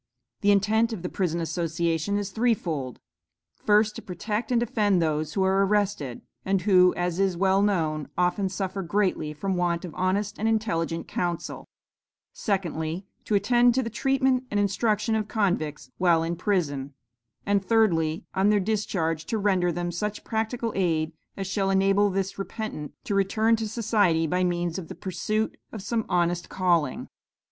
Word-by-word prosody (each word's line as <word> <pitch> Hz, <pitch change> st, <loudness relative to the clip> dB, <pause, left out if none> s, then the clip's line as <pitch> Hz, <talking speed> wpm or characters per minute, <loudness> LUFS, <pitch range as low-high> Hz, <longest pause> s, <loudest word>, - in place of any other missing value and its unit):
The 205 Hz, -, +3 dB
intent 215 Hz, +3 st, +3 dB
of 185 Hz, -6 st, -6 dB
the 180 Hz, -, -2 dB
Prison 175 Hz, -4 st, 0 dB
Association 165 Hz, +2 st, -1 dB
is 205 Hz, -1 st, -3 dB
threefold: 175 Hz, -, -1 dB, 0.6 s
first 210 Hz, 0 st, +3 dB
to -, -, -6 dB
protect 210 Hz, +6 st, -4 dB
and 240 Hz, -, +4 dB
defend 210 Hz, -5 st, +2 dB
those 155 Hz, -2 st, -1 dB
who 195 Hz, -, +2 dB
are 190 Hz, +1 st, +3 dB
arrested, 195 Hz, -, 0 dB, 0.2 s
and 190 Hz, -1 st, 0 dB
who, 180 Hz, -3 st, +6 dB
as 175 Hz, 0 st, -1 dB
is 190 Hz, -3 st, +1 dB
well 195 Hz, +1 st, +3 dB
known, 160 Hz, -7 st, 0 dB
often 180 Hz, +2 st, +1 dB
suffer 190 Hz, +1 st, -3 dB
greatly 185 Hz, -4 st, 0 dB
from 190 Hz, +5 st, -2 dB
want 175 Hz, 0 st, 0 dB
of 170 Hz, -, -8 dB
honest 195 Hz, +3 st, -1 dB
and 220 Hz, -, 0 dB
intelligent 170 Hz, -7 st, -1 dB
counsel; 175 Hz, -1 st, -3 dB, 0.6 s
secondly, 175 Hz, -3 st, -2 dB, 0.2 s
to 210 Hz, -, +1 dB
attend 240 Hz, +4 st, +4 dB
to 260 Hz, -, +2 dB
the 230 Hz, -, -5 dB
treatment 265 Hz, +1 st, +1 dB
and 205 Hz, -, 0 dB
instruction 210 Hz, +2 st, +1 dB
of 215 Hz, -1 st, 0 dB
convicts 175 Hz, -, -1 dB
while 170 Hz, -3 st, +4 dB
in 170 Hz, +1 st, -2 dB
prison; 145 Hz, -8 st, -1 dB, 0.5 s
and 200 Hz, -1 st, +2 dB
thirdly, 180 Hz, -6 st, +2 dB
on 195 Hz, +2 st, +3 dB
their 210 Hz, -1 st, +4 dB
discharge 185 Hz, -6 st, -1 dB
to 225 Hz, -, -2 dB
render 190 Hz, -4 st, +2 dB
them 175 Hz, +1 st, -3 dB
such 210 Hz, +5 st, -3 dB
practical 225 Hz, +1 st, -2 dB
aid 165 Hz, -4 st, 0 dB, 0.2 s
as 195 Hz, -, -3 dB
shall 195 Hz, +1 st, 0 dB
enable 195 Hz, +1 st, +3 dB
the 195 Hz, 0 st, 0 dB
repentant 195 Hz, -7 st, -5 dB
to -, -, -3 dB
return 215 Hz, +3 st, +3 dB
to 220 Hz, -1 st, -3 dB
society 205 Hz, -7 st, +2 dB
by 180 Hz, +3 st, 0 dB
means 175 Hz, 0 st, -1 dB
of 170 Hz, -, -8 dB
the -, -, -8 dB
pursuit 215 Hz, +4 st, -2 dB
of 220 Hz, -, -6 dB
some 225 Hz, +1 st, -1 dB
honest 175 Hz, -1 st, 0 dB
calling. 170 Hz, -7 st, +1 dB
195 Hz, 165 wpm, -26 LUFS, 170-210 Hz, 0.6 s, who